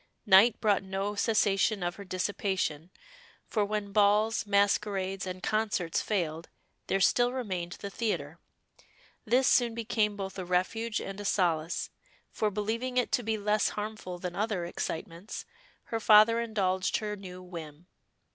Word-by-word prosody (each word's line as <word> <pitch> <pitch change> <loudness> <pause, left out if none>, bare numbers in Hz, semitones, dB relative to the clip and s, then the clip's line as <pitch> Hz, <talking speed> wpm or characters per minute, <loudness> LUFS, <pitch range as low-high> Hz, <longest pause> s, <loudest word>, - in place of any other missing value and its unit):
Night 210 +3 +6
brought 210 -4 +2
no 195 +1 -3
cessation 205 -1 +2
of 175 +1 -2
her 200 - -8
dissipation, 185 -4 -2 0.6
for 215 - 0
when 205 0 -3
balls, 210 +2 +3
masquerades, 200 -1 +1
and 185 0 -6
concerts 210 -6 0
failed, 165 -5 -2 0.4
there 195 - +1
still 245 +5 +3
remained 185 -9 -3
the 200 - -7
theatre. 170 -8 -3 0.9
This 250 +4 +3
soon 235 -2 +3
became 215 -2 0
both 195 -1 -5
a - - -3
refuge 185 +6 -1
and 195 +1 -6
a - - -7
solace, 170 -4 0 0.4
for 215 - 0
believing 225 +5 -2
it 250 - +1
to - - +2
be 220 -1 -1
less 210 +1 +1
harmful 210 -4 -5
than 175 0 -5
other 205 -4 -1
excitements, 170 +2 -5 0.4
her 225 - -3
father 220 +1 +6
indulged 190 -5 0
her 210 -1 -3
new 185 -2 -10
whim. 165 -3 -9
200 Hz, 145 wpm, -29 LUFS, 185-215 Hz, 0.9 s, Night